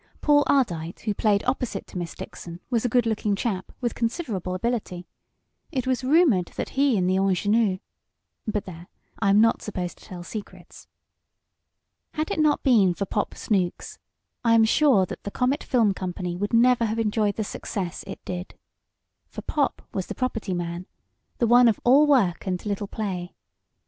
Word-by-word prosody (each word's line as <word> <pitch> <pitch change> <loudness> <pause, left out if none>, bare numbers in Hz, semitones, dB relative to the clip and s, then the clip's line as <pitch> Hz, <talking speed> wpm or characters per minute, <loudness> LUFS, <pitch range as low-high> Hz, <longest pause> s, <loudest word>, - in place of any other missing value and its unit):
Paul 290 -1 +4
Ardite, 175 - 0
who 215 - -1
played 205 -1 +1
opposite 250 -5 -2
to - - -9
Miss 170 -2 -5
Dixon, 170 0 -9
was 235 -2 +1
a 245 - +1
good 245 +1 +2
looking 215 -2 0
chap, 195 -3 -3
with 240 -2 -1
considerable 225 - -2
ability. 185 -4 -3 0.7
It 260 -2 -2
was 260 0 0
rumored 260 - +4
that - - -3
he 275 -4 +2
and 180 -1 +1
the 185 +1 +2
ingenue 195 +1 +2 0.7
but 210 -1 -2
there, 175 -1 -10 0.3
I 200 - +2
am 200 +1 +5
not 230 0 +3
supposed 180 -4 -5
to - - -17
tell 180 -2 -8
secrets. 205 +4 -9 1.3
Had 310 0 -2
it - - -1
not 305 -1 +2
been 205 -9 +4
for 200 - -2
"Pop" 205 +2 -2
Snooks, 185 -5 -2 0.4
I 230 -1 +4
am 225 -1 +6
sure 230 -5 +4
the - - -7
Comet 255 +7 0
Film 225 -6 +2
Company 180 -1 -4
would 205 +3 -3
never 235 0 +4
have 220 +1 -2
enjoyed 210 -2 +1
the 220 - -2
success 190 -3 -5
it 195 - -9
did. 180 0 -6 0.7
For - - -9
Pop 290 -3 -1
was 190 - -3
the - - -6
property 225 -7 -2
man 175 +1 -4 0.5
the 240 - +2
one 240 +1 +6
of 225 - +2
all 280 +5 +6
work 205 -12 +2
and 180 +1 -2
little 205 -1 -2
play. 190 -5 -4
210 Hz, 175 wpm, -25 LUFS, 185-245 Hz, 1.3 s, am